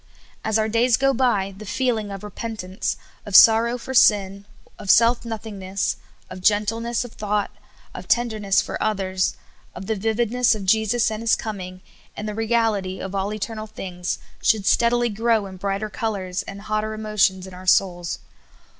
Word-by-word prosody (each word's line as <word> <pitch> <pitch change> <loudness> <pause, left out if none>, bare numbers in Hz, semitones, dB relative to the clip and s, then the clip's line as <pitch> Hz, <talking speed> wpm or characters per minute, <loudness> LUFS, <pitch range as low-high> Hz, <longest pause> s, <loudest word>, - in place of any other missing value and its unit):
As 220 0 +1
our 220 0 +1
days 230 +2 +3
go 275 0 +2
b3% 200 -7 0
the - - -8
feeling 220 -1 -1
of 195 0 -7
repentance, 210 -1 -4 0.3
of 205 -3 -4
sorrow 230 +3 +7
for 260 +2 -7
sin, 200 -4 +4 0.3
of 195 - -8
self 235 +4 +5
nothingness, 205 -4 -3 0.3
of 185 0 -9
gentleness 225 +4 +1
of 245 - -10
thought, 210 -1 -2 0.4
of - - -8
tenderness 215 -5 +2
for - - -5
others, 190 -3 0 0.4
of 185 - -7
the 220 - -1
vividnCvSs 225 +3 +1
of 200 -3 -6
Jesus 220 +3 +2
and 215 0 -4
His 230 -1 +3
coming, 185 -4 -6 0.4
and 210 - -4
the 210 - -3
reality 220 -4 0
of 190 - -6
all 195 +1 -1
eternal 215 +1 -5
things, 180 -4 -5 0.2
should 215 -3 +2
steadily 240 +2 +3
grow 225 0 +1
in 190 -1 -9
brighter 200 +3 -3
colors 195 -6 -3
and 200 0 -8
hot 215 0 -1
ter 215 0 -4
emotions 210 -3 +1
in 190 - -11
our 185 +1 -11
souls. 175 -1 +2
215 Hz, 165 wpm, -23 LUFS, 195-225 Hz, 0.4 s, sorrow